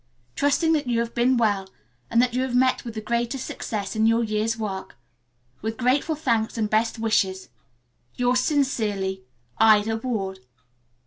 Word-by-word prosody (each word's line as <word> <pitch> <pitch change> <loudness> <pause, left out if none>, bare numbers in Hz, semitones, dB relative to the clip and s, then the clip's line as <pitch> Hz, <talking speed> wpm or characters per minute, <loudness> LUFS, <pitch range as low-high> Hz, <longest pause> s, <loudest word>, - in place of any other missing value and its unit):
Trusting 320 +3 +2
that 295 -4 0
you 235 -1 +1
have 235 0 -2
been 245 +2 +2
well 205 -4 +1 0.4
and 230 - +2
that 250 -1 -1
you 255 - 0
have 260 -1 -2
met 255 +1 +3
with 230 -2 -7
the 215 - -4
greatest 235 +3 -2
success 205 -1 -4
in 220 +1 +3
your 230 +1 +3
year's 220 +1 -1
work. 200 -4 -5 0.7
With 220 +1 -3
grateful 260 +5 +1
thanks 235 -7 0
and 220 -2 +1
best 220 +3 +1
wishes. 195 -4 0 0.7
"Yours 250 0 +2
sincerely, 215 - -1 0.3
"IDA 220 0 +5
WARD." 215 -6 -3
230 Hz, 155 wpm, -24 LUFS, 215-250 Hz, 0.7 s, IDA